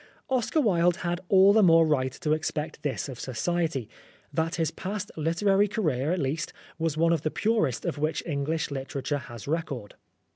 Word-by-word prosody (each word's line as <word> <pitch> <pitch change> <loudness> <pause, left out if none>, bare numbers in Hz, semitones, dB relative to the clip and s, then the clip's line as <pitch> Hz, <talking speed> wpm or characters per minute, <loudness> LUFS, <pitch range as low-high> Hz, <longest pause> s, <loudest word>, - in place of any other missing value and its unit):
Oscar 255 +4 +1
Wilde 175 - +3
had 175 +1 -1
all 195 +1 +7
the 220 - +5
more 165 -3 +6
right 130 -4 +1
to 150 +2 -3
expect 155 0 -3
this 145 -1 -2
of 130 -4 -8
Society, 155 -1 -1 0.5
that 165 +2 0
his 165 -3 0
past 200 +3 -5
literary 195 +6 +2
career, 155 - 0
at 180 - +1
least, 155 +3 -2 0.3
was 160 -2 -1
one 165 +1 +4
of 165 - 0
the 155 - 0
purest 215 - 0
of - - -2
which 155 +2 -1
English 150 0 -1
literature 140 +1 -3
has 120 -3 -10
record. 145 -9 -3
160 Hz, 175 wpm, -27 LUFS, 145-180 Hz, 0.5 s, all